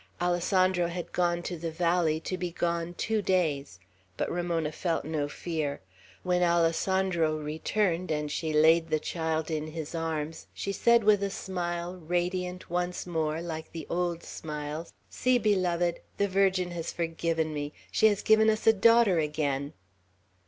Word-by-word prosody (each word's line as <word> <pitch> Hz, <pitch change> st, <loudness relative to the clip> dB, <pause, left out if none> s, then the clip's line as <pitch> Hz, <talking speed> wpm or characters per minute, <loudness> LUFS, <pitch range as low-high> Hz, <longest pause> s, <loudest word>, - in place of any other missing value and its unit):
Alessandro 180 Hz, 0 st, +2 dB
had 175 Hz, 0 st, -5 dB
gone 175 Hz, -1 st, +1 dB
to 175 Hz, -, -4 dB
the 165 Hz, 0 st, -3 dB
valley, 170 Hz, -1 st, +1 dB
to 185 Hz, -, -3 dB
be 180 Hz, -1 st, -3 dB
gone 170 Hz, 0 st, -2 dB
two 220 Hz, +3 st, 0 dB
days; 150 Hz, -, 0 dB, 0.4 s
but -, -, -1 dB
Ramona 170 Hz, -3 st, -1 dB
felt 165 Hz, -1 st, -2 dB
no 150 Hz, -2 st, -2 dB
fear. 155 Hz, -3 st, -3 dB, 0.4 s
When 180 Hz, -1 st, +1 dB
Alessandro 170 Hz, -1 st, +2 dB
returned, 165 Hz, +4 st, -1 dB
and 150 Hz, -1 st, -1 dB
she 160 Hz, -1 st, -2 dB
laid 160 Hz, +2 st, +5 dB
the 155 Hz, -, +2 dB
child 160 Hz, 0 st, -2 dB
in 155 Hz, -1 st, -2 dB
his 155 Hz, 0 st, -6 dB
arms, 160 Hz, -1 st, -3 dB
she 200 Hz, -, -3 dB
said 235 Hz, +4 st, +4 dB
with 205 Hz, -1 st, +5 dB
a 200 Hz, -, 0 dB
smile, 175 Hz, -2 st, -4 dB
radiant 180 Hz, +2 st, -2 dB
once 175 Hz, +1 st, -2 dB
more, 160 Hz, -2 st, -1 dB
like 160 Hz, -2 st, -6 dB
the 165 Hz, -3 st, -6 dB
old 170 Hz, -1 st, -1 dB
smiles, 150 Hz, +1 st, -6 dB, 0.2 s
"See, 255 Hz, 0 st, +2 dB
beloved! 180 Hz, -6 st, +1 dB, 0.2 s
The 200 Hz, -, +2 dB
Virgin 190 Hz, -2 st, +2 dB
has 170 Hz, -1 st, -4 dB
forgiven 165 Hz, -1 st, -1 dB
me; 145 Hz, 0 st, -3 dB, 0.2 s
she 220 Hz, -, +5 dB
has 205 Hz, -2 st, +1 dB
given 220 Hz, 0 st, +5 dB
us 215 Hz, 0 st, 0 dB
a 225 Hz, -, +7 dB
daughter 225 Hz, -3 st, +5 dB
again!" 145 Hz, -2 st, -1 dB
170 Hz, 155 wpm, -29 LUFS, 160-185 Hz, 0.4 s, a